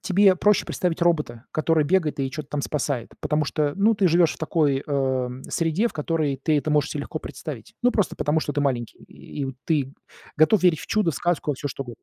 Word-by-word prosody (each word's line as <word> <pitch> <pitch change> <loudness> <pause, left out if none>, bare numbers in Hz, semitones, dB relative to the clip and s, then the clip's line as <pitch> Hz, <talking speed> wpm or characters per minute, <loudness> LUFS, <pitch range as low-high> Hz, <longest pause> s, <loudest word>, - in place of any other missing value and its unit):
тебе 195 0 +4
проще 205 +3 +2
представить 180 -1 -2
робота, 150 -9 0
который 155 -1 +2
бегает 165 -2 +1
и 135 -1 0
чё-то 150 +1 -7
там 145 - -2
спасает, 140 -5 -2
потому 150 0 0
что, 145 0 0
ну, 215 +3 +4
ты 200 -3 +3
живёшь 170 -1 +4
в - - -15
такой, 150 -4 +1
э-э, - - -12 0.4
м, 125 +2 -8
среде, 165 +7 0
в - - -4
которой 155 -2 -1
ты 155 -2 +2
это 150 +2 -2
можешь 150 -1 +2
се - - -4
легко - - -5
представить. - - -8
Ну, 245 0 +4
просто 210 - 0
потому, 155 +2 +1
что 145 - -3
ты 145 - -1
маленький, 125 -5 -1
и 140 - -7 0.2
ты 140 -4 0 0.4
готов 165 +6 +4
верить 175 -4 +4
в - - -9
чудо, 210 -6 +2
в - - -7
сказку, 175 -2 -1
во - - -1
всё, 145 +2 -4
что 135 0 -5
угодно. 120 -2 -11
155 Hz, 230 wpm, -24 LUFS, 145-175 Hz, 0.4 s, тебе